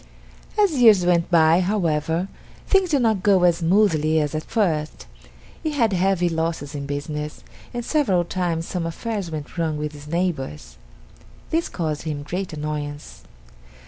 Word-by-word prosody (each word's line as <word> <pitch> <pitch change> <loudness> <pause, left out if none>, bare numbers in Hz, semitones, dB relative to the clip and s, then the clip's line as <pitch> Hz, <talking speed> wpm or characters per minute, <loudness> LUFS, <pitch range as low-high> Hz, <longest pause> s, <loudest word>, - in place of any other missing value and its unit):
As 410 -3 +5
years 210 -6 +7
went 170 -1 +2
by, 165 -1 +5
however, 170 -3 0 0.4
things 385 -2 +3
did 285 -5 +2
not 220 -4 +2
go 195 -2 +4
as 175 -2 +4
smoothly 165 -3 +3
as 150 -1 -1
at 155 - -1
first. 160 -9 -1 0.6
He 310 - -2
had 230 -7 +2
heavy 185 -1 +2
losses 160 -3 -2
in 140 -1 -5
business, 150 +1 -5 0.3
and 240 -1 -4
several 220 - +2
times 170 -2 -2
some 175 -2 -2
affairs 200 +1 -4
went 155 +2 -6
wrong 160 -2 0
with 150 0 -3
his 145 0 -12
neighbors. 135 - -3 0.7
This 330 +1 0
caused 155 -4 -3
him 150 -3 -4
great 180 +5 -4
annoyance. 150 -1 -5
170 Hz, 150 wpm, -23 LUFS, 150-195 Hz, 0.7 s, years